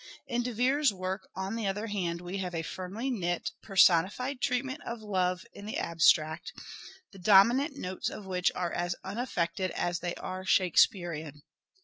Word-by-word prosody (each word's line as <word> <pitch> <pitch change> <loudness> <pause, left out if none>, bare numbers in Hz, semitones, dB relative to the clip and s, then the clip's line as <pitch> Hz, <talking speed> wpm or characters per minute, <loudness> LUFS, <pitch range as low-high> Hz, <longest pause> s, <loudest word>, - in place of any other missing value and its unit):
In 240 0 -1
De 245 +1 -3
Vere's 260 +4 +2
work 190 0 -5
on 190 +3 -3
the 225 -3 -2
other 205 +3 -2
hand 180 -6 -2
we 180 +2 -5
have 180 -2 -4
a 165 - -2
firmly 190 +10 -4
knit 175 -7 -2
personified 195 +7 +3
treatment 260 +3 -1
of 235 -2 -6
Love 185 -3 0
in 205 - -10
the 215 - -3
abstract, 160 -1 +2 0.6
the 195 - -13
dominant 230 - +5
notes 185 -4 -3
of 210 - -8
which 180 -1 +1
are 175 -2 -2
as 175 0 -1
unaffected 190 -4 -2
as 175 -1 -2
they 175 0 -3
are 185 0 -6
Shakespearean. 175 -5 +2
190 Hz, 160 wpm, -30 LUFS, 175-225 Hz, 0.6 s, dominant